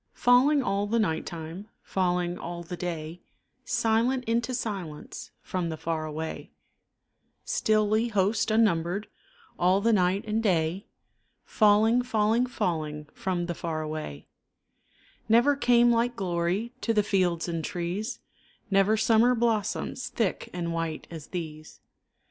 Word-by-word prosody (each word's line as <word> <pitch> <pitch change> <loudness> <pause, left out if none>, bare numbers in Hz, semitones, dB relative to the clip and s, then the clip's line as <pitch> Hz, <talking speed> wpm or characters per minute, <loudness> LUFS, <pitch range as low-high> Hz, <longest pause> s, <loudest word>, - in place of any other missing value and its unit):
Falling 265 +4 +4
all 200 -1 0
the 230 +3 +1
night 160 -8 0
time, 165 +4 -7 0.2
Falling 180 -2 0
all 170 0 -6
the 175 +1 -6
day, 170 -1 -5 0.4
Silent 240 +2 +1
into 230 +2 0
silence, 190 - -5
From 180 -2 -2
the 160 - -4
far 160 0 -2
away; 160 +1 -5 1.0
Stilly 215 +1 +2
host 205 0 +1
unnumbered, 200 -3 +1 0.5
All 185 +2 +4
the 230 +3 +2
night 190 +1 +2
and 215 +1 0
day 180 -2 0 0.6
Falling, 215 +3 +4
falling, 230 0 +1
falling, 155 -9 -3
From 180 -2 -2
the 175 - -3
far 160 -2 -3
away, 155 - -6 1.0
Never 240 +6 +5
came 240 -3 +4
like 235 +1 +1
glory 185 +4 -1
To 230 - 0
the 210 - +4
fields 180 -5 +1
and 165 -2 -3
trees, 180 +5 -3 0.5
Never 195 +3 +4
summer 225 +3 +4
blossoms 230 +2 -1
Thick 225 -6 -2
and 170 -1 -3
white 165 -2 -3
as 160 -3 -8
these. 155 -3 -7
195 Hz, 130 wpm, -27 LUFS, 170-225 Hz, 1.0 s, Never